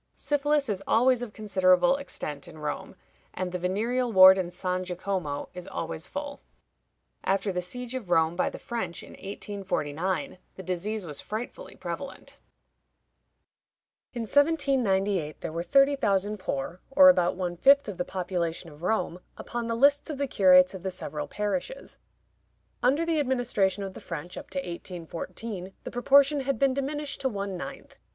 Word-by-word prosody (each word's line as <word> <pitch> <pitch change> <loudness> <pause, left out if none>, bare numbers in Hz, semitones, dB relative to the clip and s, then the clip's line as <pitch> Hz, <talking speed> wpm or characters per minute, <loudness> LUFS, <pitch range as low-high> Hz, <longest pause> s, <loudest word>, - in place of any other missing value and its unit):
Syphilis 290 0 +1
is 195 -3 -2
always 245 +2 +4
of 245 -3 -5
considerable 200 +4 +3
extent 150 - -5
in - - -12
Rome, 150 -1 -5 0.4
and 185 -1 -3
the 180 - -3
venereal 230 +7 0
ward 190 -1 +9
in 180 -2 -2
San 180 +1 -2
Jacomo 180 -5 -3
is 180 -1 -8
always 165 +1 -4
full. 285 0 -6 0.8
After 195 +1 +1
the 180 -1 -2
siege 245 +7 -5
of 245 -8 -5
Rome 165 -1 +3
by 180 - +1
the - - -8
French 205 -8 -4
in - - -12
1849, 190 - -3 0.2
the 190 - -8
disease 190 +3 -3
was 150 -4 -3
frightfully 240 - -6
prevalent. - - -7 1.7
In 240 -2 -4
1798 225 - +1
there - - -4
were 165 +1 -3
thirty 275 +9 +4
thousand 205 -4 0
poor, 165 +1 -4
or 280 +1 +7
about 180 -10 +3
one 180 -1 -3
fifth 275 +9 +5
of 205 -4 -5
the 180 - 0
population 175 -2 -3
of 150 +1 -15
Rome, 180 -2 -1 0.2
upon 240 -1 -4
the 230 - -1
lists 285 +5 +4
of 300 - -4
the 280 - 0
curates 185 -6 +5
of 190 - -7
the 190 - -2
several 150 -5 -5
parishes. 270 - -4 0.8
Under 280 +7 +3
the 330 -2 +1
administration 240 -8 +1
of 195 -1 -5
the - - -10
French, 170 +1 -6
up - - -9
to 190 - -6
1814, 180 +2 -6
the - - -6
proportion 280 +4 +4
had 275 -2 -1
been 270 +2 +3
diminished 280 +1 -3
to 265 - +1
one 200 -3 -4
ninth. 175 - -8
195 Hz, 160 wpm, -27 LUFS, 180-260 Hz, 1.7 s, ward